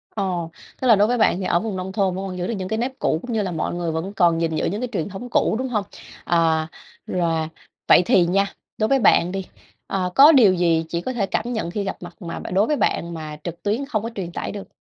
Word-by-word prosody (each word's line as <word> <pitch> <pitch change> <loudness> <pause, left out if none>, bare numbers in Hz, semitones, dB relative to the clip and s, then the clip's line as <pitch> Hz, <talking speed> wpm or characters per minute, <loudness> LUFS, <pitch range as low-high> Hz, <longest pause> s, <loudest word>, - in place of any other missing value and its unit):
Ồ, 180 -5 -2 0.3
tức 260 - +1
là 225 - +8
đối 205 +2 +4
với 245 - +1
bạn 215 -5 +3
thì 185 - -3
ở 170 - +2
vùng 215 0 -4
nông 185 +1 -4
thôn 190 -2 0
vẫn 190 - -4
còn 185 -1 -6
giữ 180 - -2
được - - -2
những 185 - -4
cái 220 +3 -2
nếp 260 +3 -3
cũ, 155 - +1
cũng 245 -2 -5
như 220 - +1
là 190 -3 -2
mọi 165 0 -2
người 175 -1 -2
vẫn 165 +5 -4
còn 170 -4 +3
gìn 165 -1 0
giữ - - 0
những 205 +7 -2
cái 250 - -1
truyền 165 -4 -2
thống 205 +6 -8
cũ, - - +2
đúng 260 0 -2
hông? 210 -4 0 0.4
À, 160 -2 +2 0.4
rồi. 165 -3 0 0.4
Vậy - - +7
thì 175 -1 +4
nha, 195 +3 +1 0.2
đối 215 - +1
với 270 -1 +4
bạn 180 -4 +4
đi, 190 -1 -4 0.4
à, 185 -2 -1
có 290 +4 +9
điều 230 -10 +6
gì 170 -2 +2
chỉ 170 0 -2
có 255 - -4
thể 220 -5 0
cảm 235 +4 -2
nhận 195 -7 -3
khi 205 +1 -2
gặp 195 - -4
mặt 175 +3 -11
mà 170 -1 -5
bạn - - -6
đối 200 +4 +3
với 300 - +1
bạn 170 -10 0
mà 155 -2 -7
trực 170 -1 -7
tuyến 220 +7 0
không 220 -7 -2
có 230 - -3
truyền 175 -3 -4
tải - - -4
được? 200 -1 -7
190 Hz, 280 wpm, -22 LUFS, 170-215 Hz, 0.4 s, có